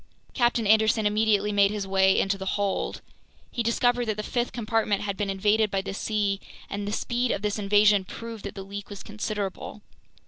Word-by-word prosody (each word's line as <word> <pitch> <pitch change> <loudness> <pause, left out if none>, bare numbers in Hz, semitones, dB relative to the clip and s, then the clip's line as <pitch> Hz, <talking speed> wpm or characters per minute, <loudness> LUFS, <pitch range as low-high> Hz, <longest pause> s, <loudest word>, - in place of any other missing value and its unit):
Captain 240 -2 +2
Anderson 220 +1 +4
immediately 210 0 +2
made 200 -1 +4
his 205 -1 -3
way 190 0 +3
into 195 0 +1
the 190 0 -6
hold. 200 -1 -2 0.5
He 240 - -2
discovered 245 +1 +1
that 215 -1 -1
the 215 - -3
fifth 240 +2 -1
compartment 220 -3 0
had 200 -1 -2
been 200 0 -2
invaded 210 +3 +2
by 195 0 -1
the 195 0 -5
sea, 205 -1 -1 0.3
and 200 0 -3
the - - -2
speed 240 +3 -1
of 205 - -1
this 210 0 -1
invasion 205 0 +4
proved 230 +1 -8
that 200 - -6
the 195 - -6
leak 200 0 -7
was 200 -1 -8
considerable. 210 -1 -5
210 Hz, 195 wpm, -26 LUFS, 200-220 Hz, 0.5 s, Anderson